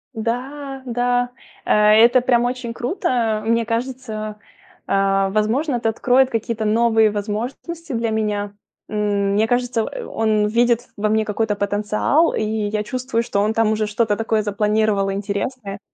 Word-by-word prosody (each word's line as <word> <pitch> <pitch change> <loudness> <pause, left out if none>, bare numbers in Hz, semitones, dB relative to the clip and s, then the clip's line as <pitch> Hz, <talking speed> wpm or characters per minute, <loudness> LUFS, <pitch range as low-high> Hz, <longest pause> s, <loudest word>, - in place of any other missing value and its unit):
Да, 265 +5 -4
да, 245 0 0 0.4
э - - -1 0.3
это 245 +1 +4
прям 240 -1 +2
очень 245 -1 -3
круто. 240 - -1
Мне 230 +1 +1
кажется, 230 -3 -4 0.5
э, 195 0 +2
возможно, 225 +8 0
это 230 -2 0
откроет 255 +4 +3
какие-то 225 -1 -2
новые 220 0 +3
возможности 240 +11 -5
для 230 -2 -1
меня, 210 -2 -1 0.3
м. 205 -2 0
Мне 210 +2 +3
кажется, 245 -1 0
э, - - -6
он 215 -1 +1
видит 235 +2 +2
во 215 0 -1
мне 220 0 +2
какой-то 210 0 -1
потенциал, 210 +10 +1
и - - -1
я 215 -1 -1
чувствую, 245 +1 -2
что 200 -3 -1
он 215 +2 +1
там 220 -1 +2
уже 215 0 -1
что-то 210 0 0
такое 220 0 0
запланировал 210 -1 +1
интересное. 200 +1 -4
220 Hz, 145 wpm, -20 LUFS, 210-245 Hz, 0.5 s, это